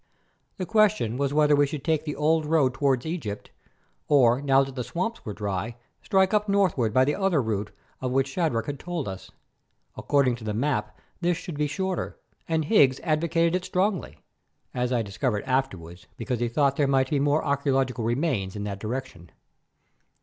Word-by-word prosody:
The 185 - -3
question 215 - +2
was 140 +1 0
whether 150 0 +4
we 145 0 +3
should 140 -1 -6
take 160 -2 0
the 150 - -3
old 155 +1 +1
road 150 -5 +3
toward 135 -2 +1
Egypt, 155 - -5 0.6
or 130 -3 +4
now 135 -1 +4
that 135 0 -7
the 125 -1 -3
swamps 185 - -3
were 105 - -5
dry, 105 +2 -3 0.3
strike 190 -1 +2
up 210 0 +1
northward 180 - +2
by 130 +4 +4
the 145 - +1
other 190 -4 +1
route 105 -4 -2 0.3
of 130 - -1
which 135 +1 +2
Shadrach 135 -9 -1
had 140 +1 -5
told 170 -5 -4
us. 95 -1 -7 0.7
According 135 -4 +1
to 115 - -12
the 105 -1 -3
map 110 -4 -1 0.2
this 175 -1 +1
should 175 - -7
be 150 +1 0
shorter, 190 +4 -3 0.3
and 160 -1 +1
Higgs 140 - +4
advocated 165 +1 +1
it 185 - -1
strongly, 190 +1 -1 0.6
as 125 0 -1
I 120 -3 +1
discovered 105 +2 -2
afterwards 95 -11 -3
because 125 -3 -3
he 120 - 0
thought 140 +2 +1
there 145 - +2
might 135 -1 +2
be 145 - +2
more 145 +2 +2
archæological 135 -4 0
remains 115 - -1
in 105 - -4
that 100 -1 -4
direction. 110 -6 -6
140 Hz, 180 wpm, -26 LUFS, 120-160 Hz, 0.7 s, whether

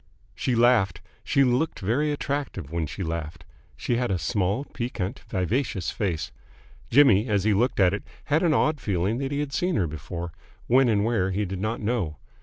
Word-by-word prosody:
She 125 - -1
laughed. 115 -7 +3 0.2
She 140 -2 +3
looked 130 +5 +1
very 125 +10 +1
attractive 140 - -3
when 85 -2 -1
she 95 - -5
laughed. 80 -1 -5 0.3
She 120 - -1
had 125 0 0
a 95 - +1
small, 100 - 0
piquant, 120 -8 -4
vivacious 95 - -1
face. 90 -7 -2 0.6
Jimmy, 120 -5 +5
as 100 -4 +1
he 110 0 +3
looked 120 +5 +1
at 95 -1 +5
it, 100 - -2 0.2
had 150 +3 +1
an 170 - +3
odd 155 -2 +2
feeling 100 +4 0
that 135 0 -2
he 145 0 0
had 140 -2 -4
seen 180 +2 0
her 95 - +2
before 85 +3 -6 0.3
when 130 +1 +4
and 105 -2 +2
where 110 -5 +1
he 100 +2 -1
did 95 0 -5
not 110 +4 -2
know. 105 -9 -1
105 Hz, 190 wpm, -26 LUFS, 90-130 Hz, 0.6 s, Jimmy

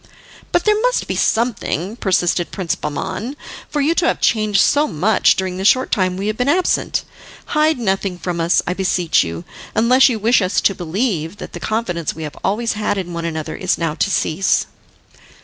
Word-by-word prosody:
"But 350 - +1
there 425 0 +3
must - - +1
be - - -2
something," 220 -4 0
persisted 175 -5 0
Prince 180 -6 -2
Bahman, 210 - -4 0.3
"for 295 - -1
you 305 +4 +2
to 335 0 +1
have - - 0
changed 215 -3 +2
so 295 +1 +3
much 190 +6 +2
during 185 -1 -3
the 190 - -4
short 255 +6 +3
time 185 -2 +1
we 195 - -3
have 215 +1 -2
been 250 +2 +1
absent. 360 +4 +1 0.5
Hide 305 0 +3
nothing 195 -4 -1
from 175 -1 -3
us, 170 +1 +2
I 180 - -1
beseech 180 -4 +1
you, 85 0 -6 0.3
unless 250 +4 +5
you 235 - -1
wish 225 +3 +3
us 185 0 +1
to 195 - +3
believe 180 -1 -2
that - - -9
the 175 - -6
confidence 175 -6 -2
we 160 - -7
have 150 - -6
always 225 +4 0
had 210 -1 -1
in 175 -2 -4
one 170 0 -4
another 160 -2 -4
is 185 -3 0
now 165 -2 -1
to 170 - 0
cease." 190 0 +1
195 Hz, 195 wpm, -19 LUFS, 175-235 Hz, 0.5 s, unless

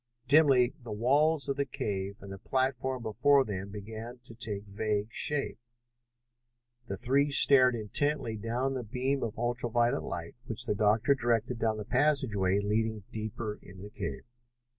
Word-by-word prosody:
Dimly 135 -4 +5
the 115 - -8
walls 140 +8 +2
of 140 0 -2
the 140 - 0
cave 100 -7 -4
and 100 0 -10
the 95 - -8
platform 130 +1 -1
before 135 +5 +3
them 100 -1 -5
began 110 +4 -8
to 120 - -10
take 105 -4 -3
vague 105 +1 -2
shape. 145 -5 0 1.3
The 100 - -4
three 140 +5 +1
stared 130 -3 +7
intently 120 +3 -1
down 120 +5 -2
the 130 - -3
beam 130 +4 -2
of 110 -1 -4
ultra 120 0 -2
violet 120 +4 +1
light 85 -1 -6
which 115 0 0
the - - 0
doctor 110 +6 +3
directed 120 -1 -1
down 110 -2 0
the 105 - -6
passageway 110 -12 +2
leading 110 +1 -1
deeper 110 0 -5
into 95 +1 -13
the 105 - -9
cave. - - -5
115 Hz, 160 wpm, -30 LUFS, 105-130 Hz, 1.3 s, stared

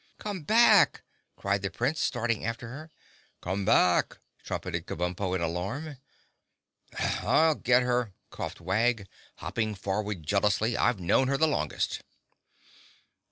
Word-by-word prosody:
"Come 205 -4 -5
back!" 215 +2 +5 0.3
cried 100 0 -1
the 95 - -2
Prince, 145 - -1
starting 120 -4 -1
after 115 +1 -4
her. 155 +6 -9 0.5
"Come 95 +2 -3
back!" 90 -4 +3 0.3
trumpeted - - -4
Kabumpo 90 +2 -2
in 95 - -2
alarm. 100 - -3 1.0
"I'll 160 0 +2
get 125 -3 +3
her!" 125 -3 0 0.2
coughed - - -6
Wag, 105 +4 0 0.3
hopping 110 -2 -3
forward 100 -1 -3
jealously. 105 +6 +1
"I've 120 -5 +1
known 90 +9 +2
her 140 +1 +1
the 160 - +4
longest." 150 - -1
110 Hz, 120 wpm, -28 LUFS, 95-135 Hz, 1.0 s, back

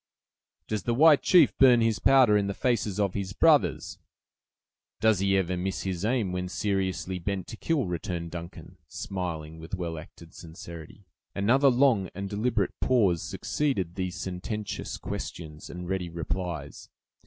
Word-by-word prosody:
"Does 110 -2 -2
the 120 - -1
white 150 +2 +6
chief 170 -6 +5
burn 125 -3 +7
his 115 -1 +1
powder 130 -6 +5
in 100 -1 +2
the 100 - -3
faces 110 -6 0
of 100 -3 +1
his 100 -1 -4
brothers?" - - +2 1.0
"Does 110 -3 +3
he 95 0 +2
ever 90 -1 0
miss 95 +2 -3
his 95 -2 -3
aim, 110 -4 0
when 90 0 -3
seriously 95 -2 -2
bent 95 +1 -3
to - - -6
kill?" 150 +2 0
returned 85 -1 -4
Duncan, 85 -1 -9
smiling 85 -6 -5
with 80 +4 -5
well 85 -3 -4
acted 80 +1 -14
sincerity. 85 +2 -11 0.3
Another 130 +8 +4
long 120 -7 +3
and 100 +1 -4
deliberate 110 +4 0
pause 100 -10 +2
succeeded 115 - -2
these 90 0 -3
sententious 95 +3 -5
questions 80 -2 -7
and 90 0 -7
ready 90 -2 -2
replies. 85 -2 -5
95 Hz, 150 wpm, -27 LUFS, 90-110 Hz, 1.0 s, burn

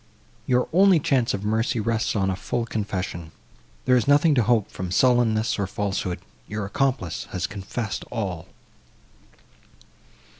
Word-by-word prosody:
Your 125 0 +2
only 190 -1 +6
chance 130 -5 +1
of 100 +1 -6
mercy 110 +3 0
rests 115 +1 0
on 95 -2 +1
a - - -2
full 115 +4 -2
confession;—there 95 - -4
is 125 - +2
nothing 145 +2 +5
to 130 - +3
hope 110 -2 +1
from 90 -1 -5
sullenness, 115 +1 +2
or 100 - 0
falsehood; 95 -2 -2 0.3
your 105 -1 -3
accomplice 125 - -1
has 90 - -2
confessed 100 +1 -4
all." 95 -8 -4
110 Hz, 135 wpm, -24 LUFS, 95-125 Hz, 0.3 s, only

